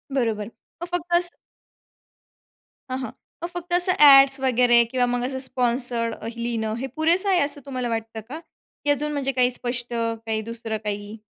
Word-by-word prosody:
बरोबर. 220 -5 -1 0.3
मग - - -3
फक्त 350 0 -3
असं 345 0 -3 1.6
हं, 255 - -1
हं. 260 - -5 0.3
मग - - -1
फक्त 350 0 -6
असं 355 +1 +6
ॲडस 275 -1 +8
वगैरे 245 -2 +4
किंवा 255 -1 +1
मग 245 0 -1
असं 260 0 -4
स्पॉन्सर्ड 245 -2 0
अ, 220 - -9
लिहिणं 230 -2 -3
हे 265 - -4
पुरेसं 340 +5 +2
आहे 370 -2 +3
असं 285 -1 -1
तुम्हाला 255 -3 -4
वाटतं 225 -1 -4
का? 305 +4 -6 0.4
की 290 - 0
अजून, 295 +1 0
म्हणजे 275 -2 -1
काही 250 -1 +2
स्पष्ट 240 -1 -2
काही 225 -1 -2
दुसरं 225 0 -5
काही? 205 +1 -5
250 Hz, 170 wpm, -23 LUFS, 230-285 Hz, 1.6 s, ॲडस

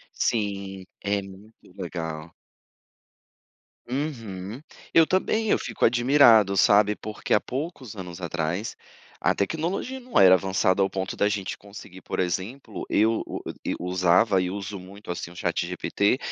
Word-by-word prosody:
Sim, 100 -3 -1 0.2
é 100 0 0
muito 100 +3 -13 0.2
legal. 80 -3 -5 1.6
Uhum, 120 -5 -4 0.3
eu 165 - +8
também 215 +3 +1
eu - - +4
fico - - -3
admirado, 120 -5 +5
sabe, 105 +2 +5
porque 105 0 -3
há 105 - +5
poucos 130 - -5
anos 90 -1 -7
atrás 85 +5 -2 0.5
a - - +3
tecnologia 170 - -2
não 250 0 -1
era 95 -1 +8
avançada 95 +1 +2
ao 95 - +1
ponto 95 -1 -3
da 105 - +3
gente 100 -2 -3
conseguir, 100 -2 -12
por - - -5
exemplo, 95 +7 -3
eu 110 +2 +3 0.6
usava 90 +2 +3
e 90 - -2
uso 100 0 -5
muito, 95 0 -8
assim, 85 - -6
o 90 - -14
chat - - -1
GPT 100 +6 0
100 Hz, 135 wpm, -25 LUFS, 95-115 Hz, 1.6 s, eu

